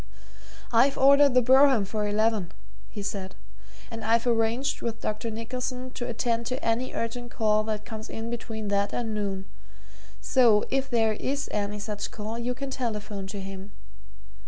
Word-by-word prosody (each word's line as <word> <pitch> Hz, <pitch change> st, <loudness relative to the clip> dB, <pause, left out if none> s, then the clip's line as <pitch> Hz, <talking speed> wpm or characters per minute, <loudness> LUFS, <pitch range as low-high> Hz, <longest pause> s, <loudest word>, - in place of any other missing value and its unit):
"I've 260 Hz, +4 st, +4 dB
ordered 280 Hz, 0 st, +6 dB
the 250 Hz, -, +6 dB
brougham 260 Hz, -3 st, +6 dB
for 210 Hz, +1 st, -2 dB
eleven," 210 Hz, -3 st, +1 dB, 0.4 s
he 205 Hz, -2 st, -6 dB
said, 195 Hz, -2 st, -4 dB, 0.6 s
"and 225 Hz, 0 st, -6 dB
I've 230 Hz, +2 st, +2 dB
arranged 235 Hz, +4 st, +1 dB
with 225 Hz, -1 st, -3 dB
Dr. 215 Hz, +2 st, -2 dB
Nicholson 250 Hz, +3 st, -4 dB
to 245 Hz, -1 st, -5 dB
attend 235 Hz, 0 st, -1 dB
to 255 Hz, +2 st, -3 dB
any 230 Hz, +3 st, 0 dB
urgent 240 Hz, +1 st, -3 dB
call 215 Hz, -2 st, +2 dB
that 215 Hz, -1 st, -3 dB
comes 220 Hz, -2 st, -7 dB
in 225 Hz, +1 st, -5 dB
between 220 Hz, -3 st, -4 dB
that 200 Hz, 0 st, +1 dB
and 225 Hz, -2 st, -2 dB
noon 195 Hz, -2 st, -2 dB, 0.7 s
so, 235 Hz, -5 st, +4 dB
if 270 Hz, 0 st, 0 dB
there 225 Hz, -3 st, +2 dB
is 280 Hz, +6 st, -2 dB
any 210 Hz, 0 st, -2 dB
such 210 Hz, 0 st, -4 dB
call, 220 Hz, +2 st, -5 dB
you 245 Hz, +1 st, -2 dB
can 275 Hz, +1 st, -5 dB
telephone 210 Hz, -6 st, -4 dB
to 200 Hz, +1 st, -6 dB
him. 195 Hz, +1 st, -8 dB
225 Hz, 160 wpm, -27 LUFS, 210-250 Hz, 0.7 s, ordered